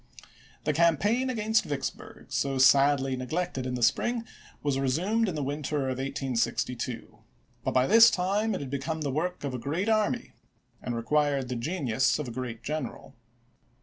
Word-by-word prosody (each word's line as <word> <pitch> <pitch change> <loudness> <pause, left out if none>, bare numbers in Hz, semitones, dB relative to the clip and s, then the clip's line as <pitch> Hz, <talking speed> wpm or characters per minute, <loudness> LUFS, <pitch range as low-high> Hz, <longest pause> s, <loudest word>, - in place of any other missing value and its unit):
The - - +1
campaign 205 - +2
against 220 -2 +1
Vicksburg, 140 -2 -6
so 135 -1 0
sadly 135 0 +4
neg 130 +2 -6
lected 165 -6 -2
in 125 - -2
the 120 - -2
spring, 230 - +1 0.4
was 140 -2 0
resumed 185 - +1
in 175 - -4
the 150 - -2
winter 145 +1 -2
of 130 0 -3
1862; 125 -3 -2 0.4
but - - -2
by 130 0 +4
this 225 +7 +8
time 205 +4 0
it - - -4
had 135 -2 -6
become 160 +3 -3
the 145 -2 -1
work 170 +5 -2
of 140 -2 -3
a 125 - -3
great 165 - -2
army 220 +2 0 0.5
and 120 - -3
required 140 +2 +1
the 125 - -2
genius 130 -2 0
of 150 -3 -4
a - - -5
great 115 -2 -6
general. 150 -3 -5
145 Hz, 170 wpm, -28 LUFS, 130-180 Hz, 0.5 s, this